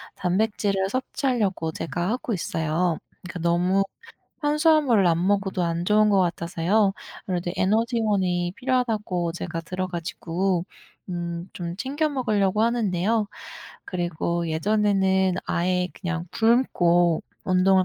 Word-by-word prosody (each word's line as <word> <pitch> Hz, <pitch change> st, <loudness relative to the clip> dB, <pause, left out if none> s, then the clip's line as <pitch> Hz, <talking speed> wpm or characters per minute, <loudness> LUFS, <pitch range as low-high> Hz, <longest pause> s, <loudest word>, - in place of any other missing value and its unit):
단백질을 195 Hz, +1 st, 0 dB
섭취하려고 225 Hz, -, -1 dB
제가 175 Hz, +2 st, -3 dB
하고 245 Hz, 0 st, -2 dB
있어요. 165 Hz, -2 st, 0 dB, 0.3 s
그 170 Hz, -1 st, -6 dB
너무 180 Hz, +3 st, +2 dB, 0.6 s
탄수화물을 295 Hz, -, +4 dB
안 170 Hz, +2 st, +2 dB
먹어도 195 Hz, -2 st, +1 dB
안 170 Hz, 0 st, -1 dB
좋은 210 Hz, +3 st, +4 dB
것 195 Hz, -2 st, +4 dB
같아서요. 180 Hz, +4 st, +1 dB, 0.3 s
그래도 175 Hz, -2 st, -2 dB
에너지원이 200 Hz, -4 st, +1 dB
필요하다고 215 Hz, -9 st, -1 dB
제가 170 Hz, -1 st, -4 dB
들어 185 Hz, +2 st, -3 dB
가지고 175 Hz, +1 st, -2 dB, 0.5 s
음 170 Hz, 0 st, -4 dB
좀 170 Hz, -1 st, -5 dB
챙겨 280 Hz, +9 st, -1 dB
먹으려고 215 Hz, -8 st, +1 dB
하는데요. 215 Hz, -2 st, +1 dB, 0.6 s
그리고 170 Hz, -1 st, -2 dB
예전에는 190 Hz, +1 st, +2 dB
아예 180 Hz, +1 st, +1 dB
그냥 175 Hz, -1 st, -4 dB
굶고 175 Hz, -8 st, +3 dB, 0.2 s
운동을 185 Hz, 0 st, +4 dB
185 Hz, 285 characters per minute, -24 LUFS, 175-215 Hz, 0.6 s, 탄수화물을